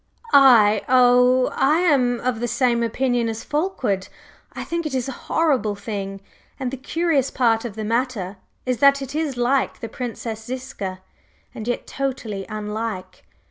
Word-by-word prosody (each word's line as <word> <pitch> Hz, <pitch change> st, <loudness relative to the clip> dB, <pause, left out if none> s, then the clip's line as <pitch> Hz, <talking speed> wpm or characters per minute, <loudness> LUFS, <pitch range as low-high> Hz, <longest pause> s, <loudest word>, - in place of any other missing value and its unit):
"I? 235 Hz, -7 st, +7 dB
Oh, 250 Hz, 0 st, +5 dB
I 305 Hz, +5 st, +3 dB
am 255 Hz, -8 st, +2 dB
of 250 Hz, -3 st, -1 dB
the 240 Hz, -, -1 dB
same 235 Hz, 0 st, +1 dB
opinion 240 Hz, 0 st, 0 dB
as 225 Hz, 0 st, -5 dB
Fulkeward, 295 Hz, -, -1 dB, 0.4 s
I -, -, -6 dB
think 335 Hz, -1 st, -3 dB
it 275 Hz, -, -4 dB
is 255 Hz, -1 st, -1 dB
a -, -, -3 dB, 0.2 s
horrible 270 Hz, -10 st, +1 dB
thing. 200 Hz, -1 st, -5 dB, 0.4 s
And 255 Hz, -2 st, -2 dB
the 270 Hz, -, -5 dB
curious 290 Hz, 0 st, 0 dB
part 230 Hz, -2 st, +1 dB
of 220 Hz, -4 st, -6 dB
the 220 Hz, -, -4 dB
matter 225 Hz, -4 st, -2 dB, 0.3 s
is 255 Hz, -3 st, -1 dB
that 280 Hz, 0 st, +5 dB
it 270 Hz, -, -7 dB
is 300 Hz, -4 st, -2 dB
like 255 Hz, +3 st, +1 dB
the 230 Hz, -, -5 dB
Princess 225 Hz, -1 st, -6 dB
Ziska, 220 Hz, -7 st, -6 dB, 0.5 s
and 220 Hz, -, -7 dB
yet 245 Hz, -, -2 dB
totally 240 Hz, -8 st, -4 dB
unlike. 210 Hz, -3 st, -5 dB
245 Hz, 160 wpm, -22 LUFS, 220-270 Hz, 0.5 s, I